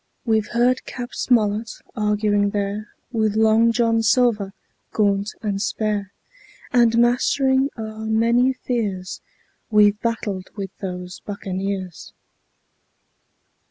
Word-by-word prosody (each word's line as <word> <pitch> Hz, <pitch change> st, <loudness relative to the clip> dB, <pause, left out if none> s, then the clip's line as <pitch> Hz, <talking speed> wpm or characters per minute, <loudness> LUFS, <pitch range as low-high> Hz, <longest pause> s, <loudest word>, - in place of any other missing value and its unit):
We've 220 Hz, -2 st, +1 dB
heard 245 Hz, +2 st, +2 dB
Cap. 245 Hz, -1 st, -7 dB
Smollett 220 Hz, -2 st, +1 dB, 0.2 s
arguing 210 Hz, -1 st, +1 dB
there 205 Hz, +1 st, -3 dB, 0.2 s
With 220 Hz, -3 st, 0 dB
Long 220 Hz, +1 st, +4 dB
John 230 Hz, -1 st, +2 dB
Silver, 220 Hz, -3 st, +2 dB, 0.4 s
gaunt 200 Hz, -1 st, +1 dB
and 200 Hz, -2 st, -1 dB
spare, 210 Hz, -2 st, -1 dB, 0.6 s
And 235 Hz, -2 st, +4 dB
mastering 265 Hz, +3 st, +3 dB
our 220 Hz, 0 st, -6 dB
many 235 Hz, +3 st, +3 dB
fears 205 Hz, -8 st, -3 dB, 0.5 s
We've 210 Hz, -1 st, +4 dB
battled 205 Hz, -5 st, -2 dB
with 195 Hz, -2 st, -6 dB
those 180 Hz, -1 st, -6 dB
buccaneers. 195 Hz, -2 st, -5 dB
215 Hz, 100 wpm, -22 LUFS, 200-230 Hz, 0.6 s, Long